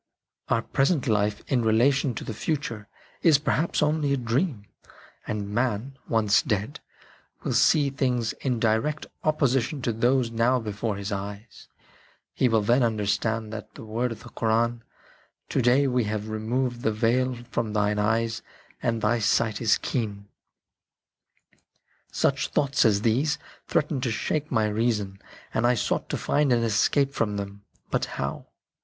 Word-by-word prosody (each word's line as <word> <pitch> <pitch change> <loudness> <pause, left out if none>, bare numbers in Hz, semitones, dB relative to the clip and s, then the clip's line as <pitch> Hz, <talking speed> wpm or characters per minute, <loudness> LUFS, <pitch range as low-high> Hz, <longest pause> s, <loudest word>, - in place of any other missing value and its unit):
Our 115 - +2
present 140 +1 +1
life 105 -2 +1
in 130 -3 +2
relation 120 +4 +2
to - - -5
the - - -5
future 115 -4 -3 0.3
is 160 -4 +6
perhaps 155 +2 0
only 150 -1 +1
a - - +1
dream, 120 - -1 0.6
and 105 -1 -3
man, 125 +2 -1
once 105 -2 +3
dead, 105 +6 -2 0.6
will - - -1
see 145 -3 +4
things 125 -4 0
in 125 -4 0
direct 115 +7 0 0.2
opposition 140 -2 +1
to 120 - 0
those 120 +1 +2
now 115 +3 +2
before 110 -1 -3
his 100 +1 -5
eyes; 100 +2 -6 0.7
he 130 - +2
will 110 -2 +2
then 120 +5 +3
understand 110 0 0
that 110 -1 -8
word 115 +3 -2
of 110 -1 -8
the - - -11
Koran, 115 +1 0 0.3
" - - -36
To - - +1
day 125 +4 +4
we 125 -3 +1
have 105 0 -3
removed 120 +3 -2
the 110 - +1
veil 125 +4 +1 0.2
from 110 -3 -1
thine 105 0 +1
eyes 110 +2 0 0.4
and 115 -1 -1
thy 115 +2 +2
sight 110 +1 +1
is 110 -2 +4
keen." 100 -4 -3 1.8
Such - - +1
thoughts 140 -1 +1
as 105 -2 +3
these 135 +7 +2 0.3
threatened 150 -3 0
to 125 - 0
shake 150 +7 -2
my 110 -4 +2
reason, 105 -3 -1 0.3
and 115 +2 +2
I 125 - +3
sought 110 - -1
to - - -1
find 145 -2 +1
an 120 -1 +3
escape 135 +6 +2
from 105 -2 -1
them. 100 0 -7 0.3
But - - +1
how 70 0 -4
115 Hz, 155 wpm, -26 LUFS, 105-130 Hz, 1.8 s, is